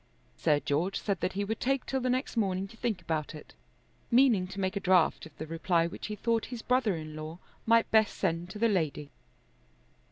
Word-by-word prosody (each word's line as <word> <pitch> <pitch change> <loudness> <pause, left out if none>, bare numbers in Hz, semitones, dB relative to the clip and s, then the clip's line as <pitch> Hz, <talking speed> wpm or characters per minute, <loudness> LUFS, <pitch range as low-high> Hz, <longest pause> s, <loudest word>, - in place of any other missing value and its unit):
Sir 150 -1 +2
George 160 +8 -1
said 200 -4 -1
that - - -1
he 200 +1 -1
would 220 +2 -3
take 270 +1 0
till 265 - -1
the 255 - 0
next 255 +2 -1
morning 195 -3 0
to - - -14
think 220 -6 -2
about 155 -2 -2
it, 150 - -12 0.6
meaning 235 -7 +4
to 190 +2 -7
make 190 +1 -1
a - - 0
draft 180 -4 +3
of 155 - -21
the 155 - -5
reply 165 +1 +1
which 170 - -6
he 210 - -4
thought 230 +1 0
his 245 -3 -7
brother 250 -6 +2
in 155 -1 -7
law 155 +2 -6 0.3
might 230 0 +4
best 220 -1 +3
send 175 -2 -1
to 210 - -7
the 230 +2 +3
lady. 155 -7 -1
190 Hz, 215 wpm, -30 LUFS, 165-225 Hz, 0.6 s, meaning